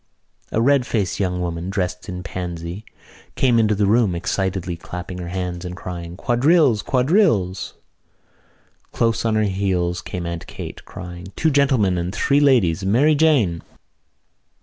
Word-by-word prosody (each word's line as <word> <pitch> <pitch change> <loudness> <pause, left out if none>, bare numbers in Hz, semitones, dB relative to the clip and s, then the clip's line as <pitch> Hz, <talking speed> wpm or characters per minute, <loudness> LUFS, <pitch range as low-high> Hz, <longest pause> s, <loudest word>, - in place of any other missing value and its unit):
A - - 0
red 130 +1 +3
faced 100 -5 -1
young 90 -2 -1
woman, 85 +1 -3
dressed 90 -1 -3
in 90 -1 -5
pansy, 85 +2 -5 0.5
came 125 -3 +3
into 110 -1 +3
the 100 0 +1
room, 105 -3 +3
excitedly 95 0 -2
clapping 90 +2 -7
her 90 - -5
hands 90 -1 -4
and 90 0 -6
crying: 85 -1 -7
"Quadrilles! 125 - +3
Quadrilles!" 130 - +1 1.2
Close 115 -1 0
on 110 -1 +2
her 110 - +2
heels 95 -3 0
came 90 -1 -5
Aunt 85 -1 -5
Kate, - - -8
crying: 90 +1 -9
"Two 160 - +1
gentlemen 130 -10 +2
and 90 +4 -3
three 140 +1 +2
ladies, 105 - +3
Mary 125 +11 +3
Jane!" 140 - +3
95 Hz, 145 wpm, -21 LUFS, 90-120 Hz, 1.2 s, red